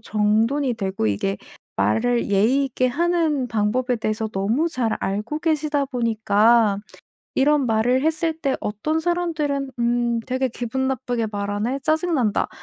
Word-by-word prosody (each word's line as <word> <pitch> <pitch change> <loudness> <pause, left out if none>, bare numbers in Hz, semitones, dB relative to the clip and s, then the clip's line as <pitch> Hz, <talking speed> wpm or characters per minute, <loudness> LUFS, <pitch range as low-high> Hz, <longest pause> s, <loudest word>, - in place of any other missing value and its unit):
정돈이 225 +5 +1
되고 190 - -2
이게 195 - -1 0.4
말을 240 0 +1
예의 225 +8 +3
있게 255 -1 0
하는 320 -2 +1
방법에 240 +3 0
대해서 220 0 -2
너무 220 +10 0
잘 240 -7 -1
알고 210 +10 -3
계시다 305 -3 0
보니까 225 -3 +2 0.6
이런 285 -1 +3
말을 240 +4 +2
했을 320 0 0
때 275 -4 -1
어떤 225 +10 -2
사람들은 315 -5 -1
"음 235 0 +1
되게 260 0 0
기분 255 +3 -2
나쁘게 245 -3 -2
말하네. 205 +5 -2
짜증 320 +2 +1
난다." 225 -7 +1
245 Hz, 285 characters per minute, -22 LUFS, 220-290 Hz, 0.6 s, 예의